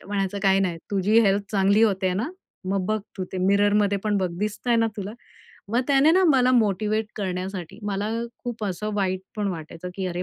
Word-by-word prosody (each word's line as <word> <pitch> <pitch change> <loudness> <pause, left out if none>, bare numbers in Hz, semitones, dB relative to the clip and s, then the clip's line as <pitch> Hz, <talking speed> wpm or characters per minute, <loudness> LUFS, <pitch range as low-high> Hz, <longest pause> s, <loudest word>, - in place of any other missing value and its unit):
तर - - -17
म्हणायचा 200 -1 -2
"काही 195 0 +4
नाही 175 -3 -1
तुझी 205 +3 +3
हेल्थ 200 -1 +3
चांगली 200 +2 +3
होते 190 -4 +2
ना, 235 - -2 0.4
मग 195 -1 0
बघ 215 +1 0 0.2
तू 185 - -1
ते 185 - -3
मिररमध्ये 205 0 +3
पण 210 -1 +1
बघ 185 -2 -1
दिसतय 215 +3 0
ना 225 - +3
तुला?" 200 +1 -5 0.6
मग 240 - +3
त्याने 280 +3 +5
ना 375 - +4
मला 255 -3 +4
मोटिव्हेट 215 -1 +1
करण्यासाठी, 185 -1 -4
मला 200 +1 -1 0.4
खूप 235 -3 -4
असं 205 +2 -3
वाईट 190 -2 0 0.2
पण 205 -2 -1
वाटायचं 165 0 -6
की 190 -1 -2
"अरे 175 0 -3
200 Hz, 195 wpm, -24 LUFS, 190-215 Hz, 0.6 s, त्याने